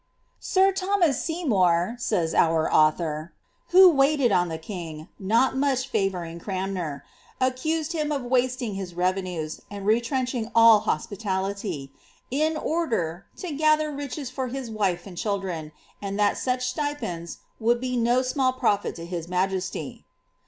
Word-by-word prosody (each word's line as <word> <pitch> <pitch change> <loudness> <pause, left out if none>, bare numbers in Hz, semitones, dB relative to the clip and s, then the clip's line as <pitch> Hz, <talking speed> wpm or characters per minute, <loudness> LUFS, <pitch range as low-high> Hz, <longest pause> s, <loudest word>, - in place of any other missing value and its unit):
^^ - - -45 0.4
Sir 385 0 +3
Tho 385 +1 0
mas 330 -8 +2
Seymour,'' 210 - +1
says 175 -9 0
our 160 -1 +2
author, 155 +1 +2 0.4
^ - - -26
who 375 +1 +9
waited 275 -4 +3
on 180 -2 +2
the 160 - -3
king, 160 -3 -7
not 230 +7 +2
much 265 -1 0
6vouring 175 -4 -2
Cranmer, 185 -7 -3 0.3
accused 310 +6 0
him 305 -2 -1
of 280 -3 -1
wasting 250 -2 0
his 190 -3 -6
revenues, 180 -3 -2
and 200 -1 -7
retrench 240 +4 +1
ing 230 -3 -3
all 230 -2 +8
hospitality, 195 -9 -3 0.4
in 310 +4 +1
order, 225 - -1
to 360 - -5
gather 310 +1 +2
riches 280 -2 -5
for 260 0 -3
his 255 -2 -5
wife 190 -5 -1
and 180 -4 -8
children/ 190 -7 -3 0.3
and 200 0 -4
that 205 -1 +3
such 250 0 -1
stipends 255 - -3 0.2
would 235 +1 +2
be 250 0 -2
no 240 +2 +2
small 255 0 +1
profit 215 -5 0
to 165 - -7
his 170 -1 -5
majesty." 185 -4 -2
220 Hz, 150 wpm, -25 LUFS, 180-265 Hz, 0.4 s, who